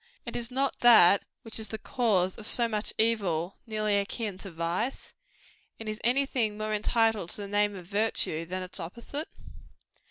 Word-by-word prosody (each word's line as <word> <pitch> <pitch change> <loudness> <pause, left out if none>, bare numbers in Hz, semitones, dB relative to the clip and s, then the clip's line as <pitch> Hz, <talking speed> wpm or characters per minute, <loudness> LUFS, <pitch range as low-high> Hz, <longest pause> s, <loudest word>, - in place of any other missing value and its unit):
And - - -6
is 235 -1 -2
not 265 +1 -1
that 200 -5 +7 0.2
which 225 -1 -5
is 220 - -2
the 220 - -6
cause 205 -6 0
of 220 - -4
so 235 -1 +7
much 215 -1 +1
evil, 195 -6 0
nearly 215 -2 0
akin 200 -1 -4
to 195 - -4
vice? 170 +9 -3 0.7
And 225 - -8
is 215 +1 -4
any 265 +4 +2
thing 225 -6 -2
more 215 0 -3
entitled 220 -3 +1
to 210 - -2
the - - -7
name 205 0 +1
of 180 -2 -10
virtue, 200 -5 0
than 185 +1 -4
its 185 +2 -4
opposite? 235 - -6
215 Hz, 180 wpm, -28 LUFS, 190-230 Hz, 0.7 s, that